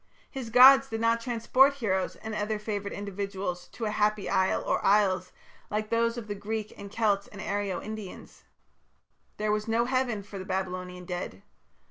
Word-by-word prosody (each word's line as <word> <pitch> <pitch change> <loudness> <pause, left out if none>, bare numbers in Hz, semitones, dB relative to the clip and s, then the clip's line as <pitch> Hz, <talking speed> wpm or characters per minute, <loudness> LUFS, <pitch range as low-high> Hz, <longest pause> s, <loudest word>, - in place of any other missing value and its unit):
His 260 -4 -6
gods 265 +3 +8
did 225 -3 -4
not 230 0 +2
transport 255 +4 +3
heroes 195 -8 -1
and 220 0 -7
other 210 +1 -1
favoured 205 -1 -4
individuals 195 -3 -4
to 225 - -6
a 210 - -1
happy 210 -1 +1
isle 190 0 +1
or - - 0
isles 190 -3 +3 0.4
like 215 0 -2
those 230 +1 +1
of 230 -3 -6
the 205 - -3
Greeks 215 +1 -4
and 200 0 -10
Celts 205 -3 +1
and 200 - -12
Aryo 200 -2 -2
Indians. 215 -3 -9 0.9
There 210 0 0
was 210 +1 -1
no 230 +1 +2
Heaven 250 -5 0
for 200 0 -9
the - - -5
Babylonian 185 -1 -4
dead. 175 - -5
210 Hz, 170 wpm, -28 LUFS, 195-230 Hz, 0.9 s, gods